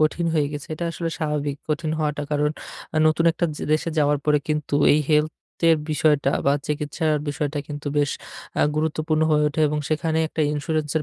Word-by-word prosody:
কঠিন 155 +2 +2
হয়ে 150 -2 +2
গেছে। 145 -1 -6
এটা 170 - -4
আসলে 165 0 -3
স্বাভাবিক 150 -2 -1
কঠিন 155 +1 -1
হওয়াটা, 150 -1 -1
কারণ 150 0 +1 0.6
নতুন 155 +2 +2
একটা 170 - -1
য - - -8
দেশে 155 +2 +1
যাওয়ার 145 -1 +3
পরে 150 -1 +4
কিন্তু 150 -2 -1 0.2
এই 150 - +4
হেলথের 150 0 +3 0.6
বিষয়টা 150 -2 +2
বা 140 - +5
চিকিৎসার 150 +1 -1
বিষয়টা 145 0 -2
কিন্তু 145 0 -7
বেশ 145 -1 +2 0.5
আ - - +5
গুরুত্বপূর্ণ 155 0 0
হয়ে 150 -1 +3
ওঠে 150 +2 -3
এবং 150 0 -1
সেখানে 160 +1 0
একটা 160 - -4
ইন্সুরেন্সের 150 +1 -1
150 Hz, 175 wpm, -23 LUFS, 145-155 Hz, 0.6 s, বা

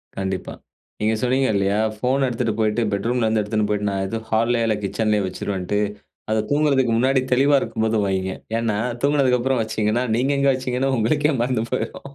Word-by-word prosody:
கண்டிப்பா. 95 -1 -3 0.5
நீங்க 110 +1 +2
சொன்னீங்க 130 +1 +2
இல்லையா? 100 +1 +1 0.2
ஃபோன் 130 +4 +1
எடுத்துட்டு 120 -2 -1
போயிட்டு, 110 +2 +1
பெட்ரூம்லருந்து 110 +1 +1
எடுத்துன்னு 105 0 -1
போய்ட்டு, 105 0 0
நான் 95 0 -1
ஏதோ 115 +3 -3
ஹால்லையோ 115 +1 +2
இல்ல 110 - +2
கிட்சன்லையோ 105 0 0
வச்சுருவேன்ட்டு. 95 +1 -3 0.5
அத 110 - +2
தூங்குறதுக்கு 140 -5 +2
முன்னாடி 130 +2 +3
தெளிவா 140 +3 +4
இருக்கும்போது 110 -1 -1
வைங்க. 95 -1 -1 0.3
ஏன்னா 110 -3 -1 0.3
தூங்குனதுக்கப்பறம் 130 -3 +2
வச்சீங்கன்னா, 110 +2 0
நீங்க 130 +4 +1
எங்க 140 0 +3
வச்சீங்கன்னு 130 +1 -1
உங்களுக்கே 150 +7 +2
மறந்து 125 -2 0
போய்ரும். 130 - -3
115 Hz, 155 wpm, -22 LUFS, 105-130 Hz, 0.5 s, தெளிவா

